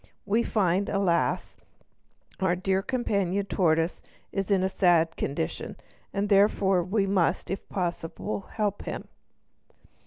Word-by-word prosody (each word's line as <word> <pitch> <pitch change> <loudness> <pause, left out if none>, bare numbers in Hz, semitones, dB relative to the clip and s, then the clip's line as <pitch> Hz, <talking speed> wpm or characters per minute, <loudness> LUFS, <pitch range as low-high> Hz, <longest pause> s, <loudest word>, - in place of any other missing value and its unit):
We 210 +3 +2
find, 200 -3 +1
alas! 190 -4 0 0.8
our 190 -3 +2
dear 190 +1 0
companion 200 -6 -1
the 200 - +1
tortoise 165 -1 +2 0.3
is 195 0 -2
in 195 -2 +3
a - - +3
sad 175 -4 +3
condition, 135 - -3 0.4
and 200 +1 -1
therefore 195 -2 +4
we 195 +3 +1
must, 190 -3 +1
if 190 - -5
possible, 180 +2 -3
help 205 -2 -1
him." - - -5
195 Hz, 125 wpm, -27 LUFS, 175-200 Hz, 0.8 s, therefore